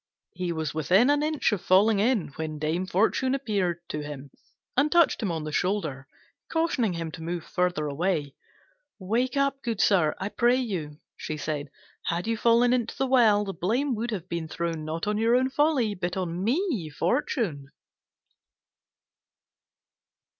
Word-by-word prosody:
He 180 -1 -3
was 160 -3 -3
within 185 - +4
an 290 0 +2
ace 305 -3 +1
of 205 -4 -1
falling 195 +3 +4
in, 220 -3 +1
when 155 +1 -5
Dame 160 +5 -1
Fortune 225 +8 +1
appeared 200 -10 -1
to 150 - -3
him 145 -2 -8 0.4
and 290 +3 +3
touched 340 -6 +4
him 205 -5 -1
on 160 -2 -3
the 155 - -5
shoulder, 155 -8 -1 0.4
cautioning 290 - +1
him 165 -1 -4
to 160 - -9
move 170 0 -4
further 180 -4 -1
away. 150 -1 -1 0.6
"Wake 235 +7 -1
up, 275 0 +1
good 230 -4 -3
sir, 175 -9 +3
I 195 - -2
pray 240 +3 +3
you," 180 - -3 0.2
she 155 - -5
said; 150 -1 -3 0.4
"had 170 +1 -1
you 230 0 0
fallen 235 +2 +4
into 240 -3 -1
the 270 - +1
well, 225 -6 +4
the 195 - -4
blame 240 - 0
would 230 +1 -3
have 190 -6 -4
been 170 -2 -3
thrown 165 -1 -3
not 160 +1 -3
on 210 0 0
your 230 +2 +3
own 260 +1 +2
folly 280 -7 +2
but 180 -1 -3
on 180 -1 -3
me, 250 - 0
Fortune." 170 - -1
195 Hz, 165 wpm, -26 LUFS, 160-240 Hz, 0.6 s, within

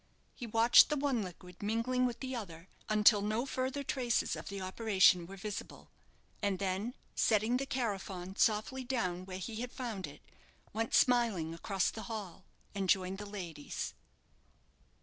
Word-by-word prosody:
He 240 - -7
watched 225 +2 +7
the 300 - 0
one 275 -4 +1
liquid 180 -1 -9
mingling 230 +4 +1
with 240 -1 -6
the 260 -1 -3
other 175 -6 -7 0.2
until 210 0 +6
no 215 +4 0
further 265 +1 -2
traces 255 -5 0
of - - -8
the 200 0 -5
operation 190 -2 +3
were 195 +2 -9
visible; 205 +1 -7 0.5
and 200 -2 +1
then 200 +6 -2 0.2
setting 220 +3 +2
the 275 +1 -3
carafon 195 -7 -3
softly 220 +6 +1
down 185 -8 -2
where 185 -1 -5
he 215 +4 -5
had 245 +2 -4
found 230 -7 -4
it, - - -13 0.5
went 225 +1 0
smiling 225 -10 +3
across 190 +3 0
the 220 - -7
hall 195 -5 -6 0.3
and 195 -2 -2
joined 190 +1 +2
the 205 - -6
ladies. 175 -7 -5
210 Hz, 155 wpm, -33 LUFS, 190-240 Hz, 0.5 s, watched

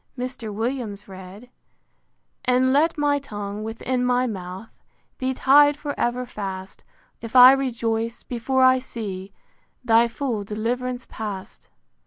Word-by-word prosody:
Mr. 245 -3 -5
Williams 225 -2 -4
read: 190 +2 -11
VI. 250 - -18 1.0
And 255 +1 +3
let 315 +4 +2
my 290 -1 +2
tongue, 205 -5 -6
within 245 +3 -2
my 250 0 +2
mouth, 190 -1 -6 0.5
Be 260 -1 -1
ty'd 290 +2 +5
for 290 -1 -4
ever 245 +1 -1
fast, 195 -5 -7 0.4
If 230 +1 -8
I 250 +1 +11
rejoice, 230 -4 -1
before 260 +2 0
I 255 0 +6
see 200 -6 -7 0.5
Thy 230 0 +5
full 235 -3 -3
deliv'rance 245 +4 -3
past. 205 -4 -7
235 Hz, 130 wpm, -23 LUFS, 210-255 Hz, 1.0 s, I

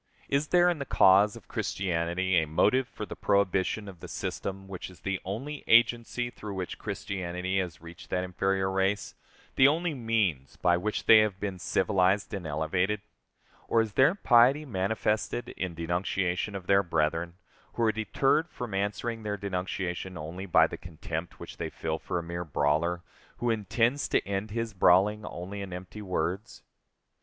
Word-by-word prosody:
Is 140 +2 +1
there, 175 +1 +4
in 175 -3 +1
the 140 - -3
cause 100 -2 +5
of - - -13
Christianity, 90 0 -1
a 80 - -3
motive 120 +11 +2
for 105 - -7
the - - -8
prohibition 100 +1 +1
of 95 -3 -10
the - - -9
system 95 0 -5
which 95 -1 -7
is 90 - -16
the 95 -1 -2
only 135 +10 -5
agency 120 +1 +3
through 105 -4 -7
which 95 -2 -5
Christianity 95 0 -3
has 85 -4 -4
reached 85 0 -11
that 90 - 0
inferior 95 +1 0
race, 95 +1 0 0.4
the 130 - +8
only 165 +3 +1
means 110 - -1
by 90 -1 +3
which 105 +5 -2
they 110 - +9
have 105 -3 +1
been 100 -3 -4
civilized 95 +2 +1
and 95 -5 -4
elevated? 90 +7 0 0.7
Or 115 - +3
is 110 -2 0
their 135 +8 +4
piety 130 -2 +5
manifested 110 +1 -1
in 90 -3 -4
denunciation 90 +3 -1
of 95 -2 -6
their 100 +1 +4
brethren, 85 -1 -1 0.4
who 120 - -1
are 110 - +4
deterred 135 - +1
from 120 -4 -6
answering 105 +4 -2
their 105 -1 -3
denunciation 95 -2 -3
only 85 +5 -6
by 90 - +6
the - - -5
contempt 80 0 -6
which - - -9
they - - -3
feel 80 0 -3
for 90 - -3
a 85 - -2
mere 85 +1 -4
brawler, 80 +3 0 0.3
who 120 -1 0
intends 115 +6 +1
to - - 0
end 100 +2 -2
his 115 +1 -3
brawling 100 +3 +4
only 95 +3 -6
in 100 -2 -6
empty 90 +4 -8
words? 95 +2 -3
95 Hz, 170 wpm, -28 LUFS, 90-110 Hz, 0.7 s, they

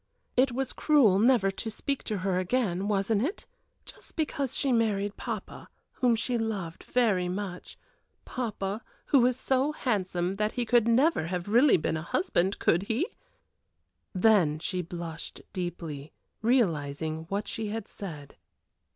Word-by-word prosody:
It 255 +1 +4
was 260 +1 -2
cruel 250 -11 +4
never 225 -4 +4
to 225 +4 -5
speak 275 +5 -3
to 215 - -1
her 185 -2 +1
again 190 -1 0
wasn't 200 +1 +1
it? 325 - -2 0.4
just - - -12
because 285 -5 -1
she 275 - +2
married 205 -4 +1
papa, 225 -5 -6 0.2
whom 245 -2 +2
she 235 +1 -1
loved 200 -7 -3
very 205 -8 +1
much 185 -1 -5 0.5
papa, 215 -4 -3 0.2
who 275 -4 +4
is 255 0 -1
so 270 +3 +1
handsome 190 - -1
that 210 +1 0
he 245 - -1
could 235 -1 +3
never 250 - +3
have 180 +1 -3
really 240 +5 +5
been 160 0 -1
a - - -4
husband, 185 +3 0
could 170 - +2
he?" 250 - +1 1.0
Then 185 -6 +4
she 180 +3 -2
blushed 170 -2 -7
deeply, 165 -5 -5 0.3
realizing 160 - 0
what 200 +1 -2
she 220 -1 -3
had 225 +2 -4
said. 150 -8 -9
205 Hz, 145 wpm, -28 LUFS, 180-245 Hz, 1.0 s, really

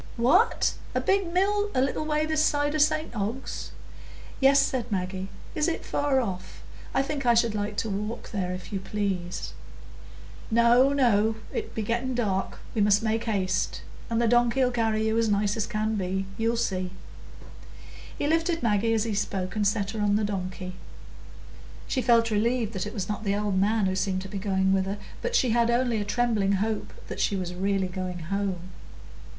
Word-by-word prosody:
"What! 355 - +3 0.2
a - - +3
big 390 -3 +1
mill 410 +3 +2
a 255 - +3
little 270 +3 0
way 305 0 +1
this 310 -1 +1
side 290 -1 +1
o' 310 - 0
St 305 -2 +2
Ogg's?" 220 +5 -4 0.7
"Yes," 275 +1 +6
said 250 -4 0
Maggie. 190 0 -2 0.2
"Is 305 +1 +1
it 335 - -2
far 285 -2 +1
off? 190 -7 -5 0.3
I 270 - +2
think 280 0 -3
I 235 - +6
should 230 -1 +3
like 205 0 -3
to 225 - -1
walk 210 +4 -4
there, 185 -4 -2
if 185 +3 -7
you 195 - -1
please." 190 -3 -3 1.0
"No, 235 +3 +5
no, 225 -6 +3 0.2
it'll - - -3
be 220 - -1
getting 240 +4 -1
dark, 195 -5 -1 0.2
we 220 - 0
must 205 +1 +4
make 225 0 0
haste. 190 -4 -1 0.3
And 230 0 +1
the 235 - +3
donkey'll 240 +2 +3
carry 220 -2 +1
you 220 +1 +2
as 225 -1 +2
nice 205 0 +1
as 220 -2 -1
can 215 -1 -1
be; 190 -1 -1
you'll 230 +1 0
see." 185 -5 -1 1.3
He - - -1
lifted 330 +1 +1
Maggie 225 0 +2
as 220 - +2
he 225 -2 -2
spoke, 190 -2 -2
and 210 -1 +2
set 200 -1 0
her 220 -1 -3
on 205 -1 +3
the 215 - +1
donkey. 185 -2 -4 1.1
She 260 - 0
felt 230 -2 +4
relieved 225 +1 +1
that 190 0 -3
it 210 - -7
was 190 -4 -3
not 210 +1 -3
the 200 -1 +1
old 205 -2 0
man 210 +1 +2
who 190 0 0
seemed 190 -1 -1
to - - -7
be 195 +1 -5
going 190 -1 +1
with 190 0 +1
her, 200 +2 -3 0.2
but 485 0 -1
she 255 - +3
had 235 0 +3
only 235 -2 +1
a - - -3
trembling 215 -3 +1
hope 215 +2 -1 0.2
that - - -6
she 200 - +1
was 180 -2 -3
really 195 +1 0
going 180 -1 -4
home. 185 +1 -3
215 Hz, 190 wpm, -27 LUFS, 195-245 Hz, 1.3 s, Yes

